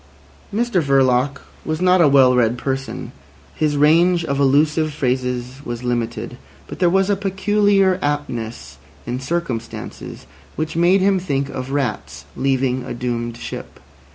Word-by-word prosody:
Mr 225 Hz, -3 st, +1 dB
Verloc 135 Hz, -1 st, +2 dB, 0.2 s
was 155 Hz, 0 st, -3 dB
not 185 Hz, 0 st, +4 dB
a 160 Hz, -, +6 dB
well 135 Hz, -2 st, +5 dB
read 120 Hz, -1 st, +2 dB
person; 135 Hz, +1 st, -4 dB, 0.4 s
his 150 Hz, -2 st, 0 dB
range 170 Hz, +4 st, +4 dB
of 140 Hz, -2 st, -2 dB
allusive 150 Hz, +3 st, +2 dB
phrases 125 Hz, -1 st, -2 dB
was 120 Hz, -1 st, -5 dB
limited, 120 Hz, -1 st, -3 dB, 0.3 s
but -, -, -9 dB
there 180 Hz, -, +4 dB
was 195 Hz, +2 st, +2 dB
a 205 Hz, -, +2 dB
peculiar 195 Hz, -1 st, +2 dB
aptness 135 Hz, -6 st, -4 dB, 0.3 s
in 125 Hz, +1 st, -3 dB
circumstances 135 Hz, -5 st, -5 dB, 0.3 s
which 155 Hz, +1 st, -3 dB
made 175 Hz, +3 st, +4 dB
him 195 Hz, 0 st, +3 dB
think 140 Hz, -6 st, -2 dB
of 130 Hz, -1 st, -5 dB
rats 140 Hz, -2 st, -3 dB
leaving 130 Hz, -1 st, 0 dB
a 125 Hz, -, -6 dB
doomed 120 Hz, -1 st, -3 dB
ship. -, -, -8 dB
140 Hz, 140 wpm, -20 LUFS, 125-175 Hz, 0.4 s, a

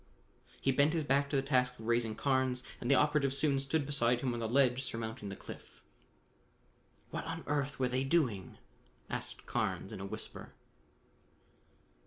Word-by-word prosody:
He 135 Hz, -, +2 dB
bent 140 Hz, +4 st, +4 dB
his 165 Hz, -2 st, +1 dB
back 140 Hz, 0 st, +2 dB
to 145 Hz, -, -1 dB
the 135 Hz, -, +2 dB
task 125 Hz, -2 st, +2 dB
of 110 Hz, -, -10 dB
raising 115 Hz, -1 st, +1 dB
Carnes, 130 Hz, -2 st, +1 dB, 0.2 s
and 120 Hz, -, -3 dB
the 140 Hz, -, +6 dB
operative 145 Hz, -1 st, +3 dB
soon 140 Hz, -1 st, +2 dB
stood 140 Hz, +2 st, 0 dB
beside 125 Hz, -4 st, +2 dB
him 130 Hz, -3 st, 0 dB
on 120 Hz, -, -3 dB
the 115 Hz, -1 st, -2 dB
ledge 130 Hz, 0 st, +4 dB
surmounting 110 Hz, -4 st, -4 dB
the 95 Hz, -, -5 dB
cliff. -, -, -11 dB, 1.3 s
"What -, -, -3 dB
on -, -, -4 dB
earth 145 Hz, -1 st, -1 dB
were 130 Hz, -, +2 dB
they 130 Hz, +1 st, +1 dB
doing?" 130 Hz, -, +1 dB, 0.5 s
asked -, -, -4 dB
Carnes 105 Hz, -, -1 dB
in 105 Hz, -, -6 dB
a 95 Hz, -, -4 dB
whisper. -, -, -6 dB
130 Hz, 170 wpm, -33 LUFS, 120-140 Hz, 1.3 s, the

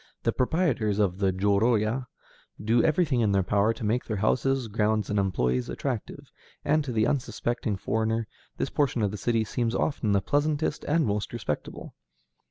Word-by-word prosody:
The -, -, +2 dB
proprietors 125 Hz, -, +1 dB
of 100 Hz, -3 st, +1 dB
the 95 Hz, -2 st, +2 dB
jōrōya 110 Hz, +5 st, +1 dB, 0.5 s
do 115 Hz, +3 st, +2 dB
everything 155 Hz, -6 st, +2 dB
in 105 Hz, -3 st, +2 dB
their 95 Hz, -1 st, +3 dB
power 100 Hz, +3 st, +2 dB
to 115 Hz, -, -7 dB
make 115 Hz, +4 st, +1 dB
their 110 Hz, -, -3 dB
houses, 125 Hz, +4 st, +1 dB
grounds, 105 Hz, -1 st, 0 dB
and 105 Hz, -, +1 dB
employees 65 Hz, -10 st, 0 dB
attractive, -, -, -5 dB, 0.3 s
and, 155 Hz, +1 st, +2 dB
to 135 Hz, -, -4 dB
the 110 Hz, -2 st, +2 dB
unsuspecting 120 Hz, -4 st, -1 dB
foreigner, 110 Hz, +2 st, -1 dB, 0.3 s
this -, -, -2 dB
portion 130 Hz, -6 st, +1 dB
of 100 Hz, -, +1 dB
the 105 Hz, -, -5 dB
city 115 Hz, +1 st, +1 dB
seems 115 Hz, +2 st, -1 dB
often 125 Hz, -6 st, 0 dB
the 100 Hz, -, +4 dB
pleasantest 145 Hz, +5 st, 0 dB
and 160 Hz, +2 st, +2 dB
most 105 Hz, -1 st, -2 dB
respectable. 110 Hz, -11 st, -5 dB
110 Hz, 170 wpm, -27 LUFS, 105-125 Hz, 0.5 s, the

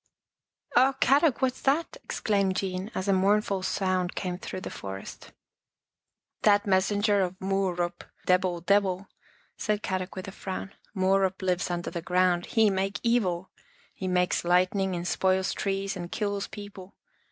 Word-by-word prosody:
" -, -, -64 dB, 0.3 s
Oh, 260 Hz, +3 st, +5 dB
Kadok, 275 Hz, 0 st, +3 dB
what's 255 Hz, -1 st, 0 dB
that? 290 Hz, +5 st, +1 dB
" -, -, -48 dB
exclaimed 200 Hz, -3 st, 0 dB
Jean, 190 Hz, +1 st, -2 dB
as 185 Hz, -, -2 dB
a 195 Hz, -, +4 dB
mournful 195 Hz, +1 st, +2 dB
sound 185 Hz, -2 st, 0 dB
came 180 Hz, -2 st, -3 dB
through 185 Hz, -, -6 dB
the -, -, -6 dB
forest. 95 Hz, 0 st, -8 dB, 0.5 s
" -, -, -59 dB
That 205 Hz, -1 st, +4 dB
messenger 205 Hz, +1 st, +2 dB
of 185 Hz, 0 st, -2 dB
Muuruup, 185 Hz, -3 st, -1 dB, 0.2 s
Debill 180 Hz, -1 st, +2 dB
deb 200 Hz, +1 st, +5 dB
ill," 190 Hz, 0 st, -3 dB, 0.5 s
said 210 Hz, -1 st, -1 dB
Kadok 185 Hz, 0 st, -3 dB
with 185 Hz, 0 st, -6 dB
a -, -, -5 dB
frown. 195 Hz, +1 st, -6 dB
" -, -, -36 dB
Muuruup 190 Hz, 0 st, +2 dB
lives 180 Hz, -1 st, 0 dB
under 175 Hz, -1 st, -3 dB
the 170 Hz, -, -4 dB
ground. 180 Hz, 0 st, +2 dB
He 220 Hz, -3 st, +3 dB
make 195 Hz, +1 st, -1 dB
evil. 190 Hz, -7 st, +1 dB, 0.4 s
He 190 Hz, -, -5 dB
makes 180 Hz, -1 st, +1 dB
lightning 185 Hz, +2 st, +2 dB
and 175 Hz, 0 st, -3 dB
spoils 190 Hz, +1 st, +1 dB
trees 195 Hz, 0 st, -2 dB
and 175 Hz, -1 st, -6 dB
kills 205 Hz, -2 st, -2 dB
peo 205 Hz, -1 st, -8 dB
ple. 190 Hz, -1 st, -12 dB
190 Hz, 165 wpm, -28 LUFS, 180-205 Hz, 0.5 s, Oh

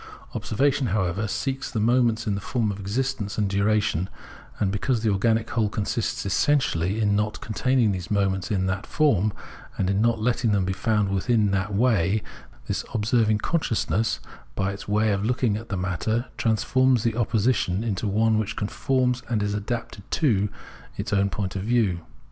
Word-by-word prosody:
Observation, 135 Hz, +3 st, +1 dB
however, 100 Hz, 0 st, 0 dB
seeks 135 Hz, +5 st, -2 dB
the 110 Hz, -, -2 dB
moments 115 Hz, 0 st, +2 dB
in 105 Hz, -, 0 dB
the 100 Hz, -, -3 dB
form 110 Hz, -1 st, -1 dB
of 100 Hz, -, -7 dB
existence 105 Hz, +1 st, -2 dB
and 105 Hz, -2 st, +1 dB
diuation; 100 Hz, -2 st, +1 dB, 0.5 s
and 95 Hz, -2 st, +1 dB
because 115 Hz, +4 st, 0 dB
the 110 Hz, -, +3 dB
organic 110 Hz, +3 st, +1 dB
whole 110 Hz, -3 st, +1 dB
consists 105 Hz, +1 st, -2 dB
essentially 100 Hz, -, +1 dB
in 105 Hz, -2 st, +2 dB
not 105 Hz, +1 st, -1 dB
containing 120 Hz, 0 st, +1 dB
the 95 Hz, -2 st, -2 dB
moments 100 Hz, -1 st, 0 dB
in 95 Hz, -4 st, 0 dB
that 95 Hz, +2 st, -2 dB
form, 110 Hz, -, +2 dB, 0.5 s
and 95 Hz, 0 st, +1 dB
in 100 Hz, +1 st, +1 dB
not 115 Hz, 0 st, +2 dB
letting 120 Hz, 0 st, +1 dB
them 100 Hz, -2 st, +2 dB
be 95 Hz, -, -1 dB
found 105 Hz, +1 st, +1 dB
within 110 Hz, +4 st, +1 dB
it -, -, +3 dB
in 100 Hz, -, +1 dB
that 100 Hz, +1 st, -1 dB
way, 105 Hz, -3 st, +2 dB, 0.4 s
this -, -, -2 dB
observing 110 Hz, -1 st, +2 dB
consciousness, 115 Hz, -4 st, 0 dB, 0.4 s
by 95 Hz, 0 st, 0 dB
its 100 Hz, -, -9 dB
way 105 Hz, +1 st, +2 dB
of 100 Hz, 0 st, 0 dB
looking 120 Hz, -1 st, +1 dB
at 115 Hz, +2 st, -6 dB
the 100 Hz, -, -2 dB
matter, 95 Hz, +6 st, -1 dB
transforms 125 Hz, +2 st, +2 dB
the 115 Hz, -2 st, 0 dB
opposition 110 Hz, -4 st, +1 dB
into 105 Hz, -2 st, -2 dB
one 110 Hz, +2 st, +2 dB
which 105 Hz, +1 st, -3 dB
conforms 125 Hz, +4 st, 0 dB
and 110 Hz, -3 st, 0 dB
is 100 Hz, 0 st, -1 dB
adapted 105 Hz, +1 st, -4 dB
to 105 Hz, -, +2 dB, 0.5 s
its -, -, -3 dB
own 100 Hz, 0 st, +3 dB
point 95 Hz, -2 st, -3 dB
of 95 Hz, -, -2 dB
view. 110 Hz, -5 st, +1 dB
105 Hz, 175 wpm, -25 LUFS, 100-115 Hz, 0.5 s, the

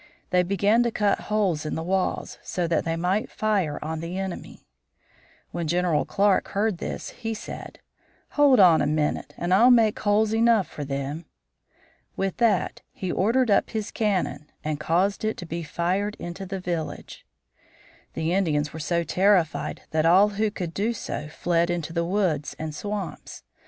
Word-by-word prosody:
They 180 Hz, 0 st, +4 dB
began 200 Hz, +5 st, +2 dB
to 240 Hz, -, +2 dB
cut 210 Hz, -3 st, +1 dB
holes 195 Hz, -8 st, +1 dB
in 155 Hz, -, -3 dB
the 160 Hz, -, -3 dB
walls, 190 Hz, +2 st, -1 dB
so 180 Hz, -, -2 dB
that 165 Hz, -2 st, 0 dB
they 165 Hz, 0 st, 0 dB
might 180 Hz, +5 st, 0 dB
fire 200 Hz, -9 st, 0 dB
on 160 Hz, +1 st, -3 dB
the 170 Hz, +3 st, -5 dB
enemy. 190 Hz, -2 st, -6 dB, 0.9 s
When 170 Hz, -2 st, -3 dB
General 175 Hz, -2 st, +1 dB
Clark 200 Hz, -1 st, +2 dB
heard 205 Hz, -4 st, +1 dB
this, -, -, -5 dB
he 225 Hz, -2 st, -4 dB
said: -, -, -8 dB, 0.5 s
"Hold 285 Hz, -5 st, +5 dB
on 175 Hz, -4 st, +7 dB
a 145 Hz, -, +1 dB
minute, 150 Hz, 0 st, -1 dB
and 175 Hz, +1 st, 0 dB
I'll 230 Hz, +6 st, +6 dB
make 225 Hz, -4 st, +4 dB
holes 210 Hz, +1 st, +2 dB
enough 225 Hz, -3 st, +3 dB
for 150 Hz, -, -7 dB
them." 140 Hz, +3 st, -4 dB, 0.9 s
With 195 Hz, -1 st, -2 dB
that 225 Hz, -6 st, +1 dB
he 185 Hz, -2 st, -4 dB
ordered 230 Hz, +4 st, +2 dB
up -, -, +3 dB
his 215 Hz, -2 st, -4 dB
cannon 185 Hz, -, -1 dB
and 155 Hz, -1 st, -2 dB
caused 180 Hz, +7 st, +1 dB
it 215 Hz, 0 st, -1 dB
to 175 Hz, -, -7 dB
be 170 Hz, +1 st, -4 dB
fired 180 Hz, +6 st, -1 dB
into 175 Hz, +3 st, -7 dB
the 195 Hz, 0 st, -4 dB
village. 175 Hz, -3 st, -5 dB, 0.9 s
The 160 Hz, +2 st, -1 dB
Indians 155 Hz, -6 st, 0 dB
were 160 Hz, -, -6 dB
so 170 Hz, +2 st, 0 dB
terrified 180 Hz, 0 st, +1 dB
that 160 Hz, +1 st, +2 dB
all 190 Hz, +5 st, +6 dB
who 210 Hz, +1 st, 0 dB
could 180 Hz, -5 st, -5 dB
do 215 Hz, +6 st, 0 dB
so 150 Hz, -8 st, -5 dB
fled 170 Hz, +2 st, 0 dB
into 170 Hz, -2 st, -3 dB
the 170 Hz, 0 st, 0 dB
woods 175 Hz, -6 st, 0 dB
and 155 Hz, -1 st, -5 dB
swamps. 205 Hz, +3 st, -6 dB
180 Hz, 170 wpm, -25 LUFS, 165-210 Hz, 0.9 s, on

